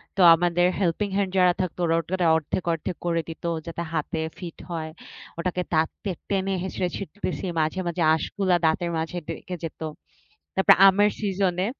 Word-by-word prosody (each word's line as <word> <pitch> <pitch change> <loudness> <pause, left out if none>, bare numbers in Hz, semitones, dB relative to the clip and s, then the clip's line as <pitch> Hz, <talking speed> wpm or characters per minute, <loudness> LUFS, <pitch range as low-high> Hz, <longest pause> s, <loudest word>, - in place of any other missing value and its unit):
তো - - -7 0.2
আমাদের 175 +1 +2
helping 195 +3 0
hand 195 -2 0
যারা 180 -1 +5
থাকতো 180 -1 -4
ওরা 165 0 +2 0.2
ওটা 180 - 0
অর্ধেক, 160 +3 -3
অর্ধেক 165 +1 -4
করে 170 -1 +1
দিতো 165 +1 -6 0.2
যাতে 165 +1 -4
হাতে 160 0 -2 0.2
ফিট 175 -3 -7
হয়। 160 -2 -3 0.5
ওটাকে 180 +1 -1
দাঁত 160 0 +3
দিয়ে 190 -4 -2
টেনে 195 -1 0
হেঁচড়ে 185 -1 -2
ছিড়তেছি, 190 +1 -4
মাঝে, 160 +4 0
মাঝে 170 0 -2
আঁশগুলা 185 +3 0
দাঁতের 170 +2 +1
মাঝে 165 +2 -3
ঢুইকে 170 +2 -5
যেত। 165 - -6 0.8
তারপর 190 - +6
আমের 205 +2 +5
সিজনে, 190 -2 0
175 Hz, 165 wpm, -25 LUFS, 165-190 Hz, 0.8 s, তারপর